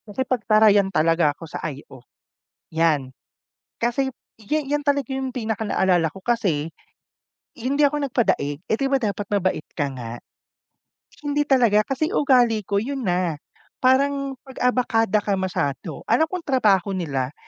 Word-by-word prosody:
Nakipagtarayan 215 -4 +3
talaga 165 -2 +3
ako 165 - -9
sa 155 - -7
IO 135 -2 -11 0.7
'yan 155 -5 +1 0.7
kasi 265 +3 0 0.2
ya 225 +8 -1
'yan 290 0 -2
talaga 280 -3 +1
'yung 265 -1 -3
pinakanaalala 205 - 0
ko, 195 - -11
kasi 185 -10 0 0.9
hindi 275 +5 +1
ako 290 0 +2
nagpadaig, 155 - 0
eh, - - +2
di 275 - +1
ba, 275 - +2
dapat 205 -3 -2
mabait 185 -6 0
ka 140 -2 0
nga, 120 -2 -6 1.1
hindi 290 0 +1
talaga 235 -6 +4
kasi 275 - -2
ugali 245 -6 +3
ko 200 - -2
'yun 270 +7 -2
na. 175 -5 0 0.4
Parang 275 +1 +2
pag-abakada 245 -5 +1
ka 205 - 0
masyado 170 -4 -3
alam 320 - +4
kong 360 0 -5
trabaho 210 -8 +2
nila 140 -8 -2
215 Hz, 135 wpm, -23 LUFS, 175-265 Hz, 1.1 s, talaga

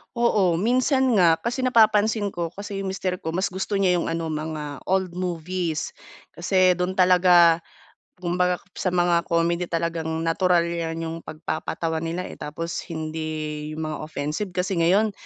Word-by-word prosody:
Oo, 210 -7 +3
minsan 255 - +2
nga. 165 -2 +6
Kasi 235 +8 -4
napapansin 220 -4 +3
ko 170 -2 -3
kasi 200 +3 -7
yung 195 - -3
mister 185 -1 -2
ko 160 +1 -4
mas 190 +1 0
gusto 190 +3 -3
niya 185 -3 +3
yung - - -2
ano, 165 -1 -2
mga 150 -2 -4
old 190 -1 +1
movies. 175 -2 -3 0.4
Kasi 185 +1 +3
do'n 180 +1 -1
talaga, 180 -2 +6 0.6
kumbaga 180 0 0 0.2
sa - - -2
mga 175 -1 +2
comedy 170 0 +1
talagang 165 -1 -2 0.2
natural 175 +1 +2
'yan 165 -1 -3
yung 165 0 -4
pagpapatawa 160 +1 -4
nila, 165 +3 -3
eh, - - -10
tapos 165 +3 -4
hindi 155 -2 -4
yung 160 - -3
mga 155 -1 -4
offensive. 160 +6 -4
Kasi 180 -1 0
ngayon, 200 +6 +3
175 Hz, 155 wpm, -24 LUFS, 165-190 Hz, 0.6 s, nga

